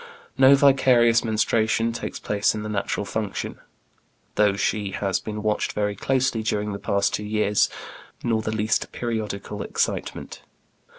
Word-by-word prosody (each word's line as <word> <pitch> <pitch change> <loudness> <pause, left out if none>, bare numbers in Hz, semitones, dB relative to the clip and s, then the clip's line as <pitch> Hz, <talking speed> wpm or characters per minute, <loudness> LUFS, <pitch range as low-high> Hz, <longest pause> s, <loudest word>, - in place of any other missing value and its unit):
No 135 +1 +7
vicarious 130 -4 +4
menstruation 115 0 +1
takes 115 - -5
the - - -16
place 105 +1 +1
of 105 - -4
the 105 - -5
natural 105 0 -2
function, 105 -1 -4 0.7
though 105 -1 +3
she 100 -1 -1
has 95 -2 -1
been 105 -1 -6
watched 105 -1 0
very 105 -1 -1
closely 130 0 0
during 105 -1 -1
the 100 - -5
past 100 0 0
two 105 - -2
years, 105 -1 +1 0.5
nor 115 -2 +1
the 110 - -3
least 110 0 0
periodical 105 -3 -4
excitement. - - -3
110 Hz, 150 wpm, -24 LUFS, 105-115 Hz, 0.7 s, No